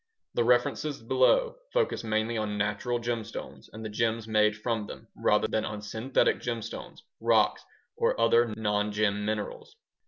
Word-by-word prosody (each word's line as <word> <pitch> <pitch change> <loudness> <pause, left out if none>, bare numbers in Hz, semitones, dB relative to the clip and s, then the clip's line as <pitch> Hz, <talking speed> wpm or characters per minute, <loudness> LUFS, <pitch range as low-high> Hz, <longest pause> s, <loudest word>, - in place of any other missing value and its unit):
The 120 - +2
references 125 +5 +1
below 130 - +3
focus - - 0
mainly 110 +1 0
on 105 -2 -2
natural 105 +4 0
gemstones 115 -1 -5
and 110 +1 -8
the - - -3
gems 115 +1 -1
made 105 -1 +3
from 110 -1 -2
them - - -10
rather - - +2
than 110 - 0
on 105 -1 -5
synthetic 110 +5 +1
gemstones, 115 -3 -5 0.2
rocks, - - +3 0.3
or - - +1
other 115 +1 +4
nongem 105 -1 0
minerals. 105 -1 -4
110 Hz, 145 wpm, -28 LUFS, 105-120 Hz, 0.3 s, other